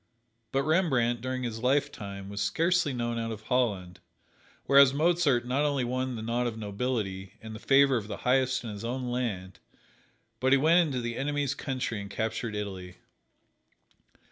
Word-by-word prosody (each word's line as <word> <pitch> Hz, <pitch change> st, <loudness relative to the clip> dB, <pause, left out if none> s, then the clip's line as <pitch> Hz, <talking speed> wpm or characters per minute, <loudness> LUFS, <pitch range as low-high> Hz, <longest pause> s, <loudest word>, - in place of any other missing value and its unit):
But 135 Hz, +1 st, +1 dB
Rembrandt, 135 Hz, -8 st, +2 dB
during 130 Hz, 0 st, -3 dB
his 115 Hz, -2 st, -4 dB
lifetime, 125 Hz, -8 st, -1 dB
was 100 Hz, 0 st, -5 dB
scarcely 165 Hz, -, +1 dB
known 120 Hz, -2 st, -2 dB
out 115 Hz, 0 st, -3 dB
of 110 Hz, -1 st, -7 dB
Holland, 100 Hz, -8 st, -1 dB, 0.7 s
whereas 140 Hz, 0 st, +6 dB
Mozart 150 Hz, -6 st, +2 dB
not 130 Hz, +3 st, 0 dB
only 145 Hz, -3 st, +1 dB
won 130 Hz, +1 st, -2 dB
the 110 Hz, -, -6 dB
nod 120 Hz, +2 st, 0 dB
of 115 Hz, -2 st, -4 dB
nobility, 100 Hz, -3 st, -3 dB
and 110 Hz, 0 st, -9 dB
the 110 Hz, -, -8 dB
favor 135 Hz, +1 st, +4 dB
of 105 Hz, -3 st, -5 dB
the -, -, -5 dB
highest 130 Hz, 0 st, +2 dB
in 115 Hz, -, -5 dB
his 105 Hz, +1 st, -7 dB
own 125 Hz, +1 st, -3 dB
land, 100 Hz, -7 st, -3 dB, 0.8 s
but 130 Hz, +1 st, +3 dB
he -, -, +7 dB
went 160 Hz, +5 st, +5 dB
into 145 Hz, -8 st, +1 dB
the 120 Hz, 0 st, -4 dB
enemy's 145 Hz, 0 st, -1 dB
country 130 Hz, -6 st, -3 dB
and 100 Hz, -, -8 dB
captured 110 Hz, +1 st, -3 dB
Italy. 95 Hz, -3 st, -5 dB
125 Hz, 170 wpm, -28 LUFS, 110-135 Hz, 0.8 s, he